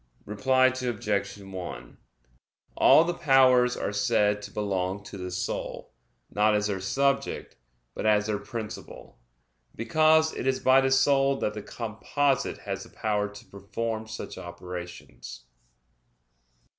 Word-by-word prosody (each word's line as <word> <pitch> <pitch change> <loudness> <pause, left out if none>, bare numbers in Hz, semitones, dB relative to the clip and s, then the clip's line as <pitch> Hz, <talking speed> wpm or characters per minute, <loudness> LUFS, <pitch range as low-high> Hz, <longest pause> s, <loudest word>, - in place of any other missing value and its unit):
Reply 130 +5 +2
Obj. 105 -6 -1
1: 90 -10 -8 0.8
All 160 - +6
the 175 +1 -1
powers 130 -6 +4
are - - -3
said 105 -1 +2
to - - -8
belong 95 -1 -2
to - - -10
the 90 -1 -5
soul, 90 0 -4 0.4
not 105 +1 +3
as 105 0 +1
their 100 -2 -1
subject, 140 +8 -1 0.4
but - - -3
as 105 -1 +3
their 105 -1 -1
principle; 115 - -8 0.6
because 155 +6 +3
it - - -4
is 130 0 +1
by 130 +1 +5
the 135 - +1
soul 135 +1 +3
that 105 - -2
the 105 - -6
composite 125 +6 -1
has - - -5
the - - -11
power 105 -1 -1
to 105 0 -13
perform 110 +3 -5
such 110 0 -7
operations. 85 -7 -9
110 Hz, 130 wpm, -27 LUFS, 100-130 Hz, 0.8 s, All